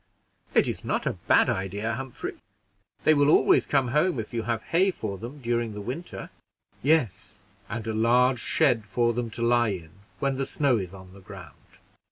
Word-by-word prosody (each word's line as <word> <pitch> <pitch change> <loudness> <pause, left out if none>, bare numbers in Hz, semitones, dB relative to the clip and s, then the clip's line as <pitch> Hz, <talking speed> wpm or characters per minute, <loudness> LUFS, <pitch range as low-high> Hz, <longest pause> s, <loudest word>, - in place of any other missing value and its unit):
"It - - +4
is - - -4
not - - -1
a - - 0
bad - - +5
idea, 100 +4 -2
Humphrey; 130 +1 -6 0.7
they 155 - +5
will 145 -1 +3
always - - +4
come 135 -3 +2
home 150 +2 +1
if 110 - -6
you 115 - -1
have 110 0 -2
hay 185 +4 +2
for 105 - -5
them 125 +6 -8
during 115 -2 -1
the - - -5
winter." 135 - -6 0.5
"Yes, 140 - 0 0.3
and 115 -2 -4
a 110 - -2
large 125 +3 +3
shed 125 -4 +2
for 120 +3 +1
them 120 0 -3
to 115 +1 -4
lie 120 0 +3
in 90 -6 -5 0.3
when 135 -1 -1
the 135 - -2
snow 140 -5 +2
is 95 -1 -6
on 95 -1 -13
the 100 - -14
ground." 95 -1 -13
120 Hz, 190 wpm, -26 LUFS, 105-135 Hz, 0.7 s, bad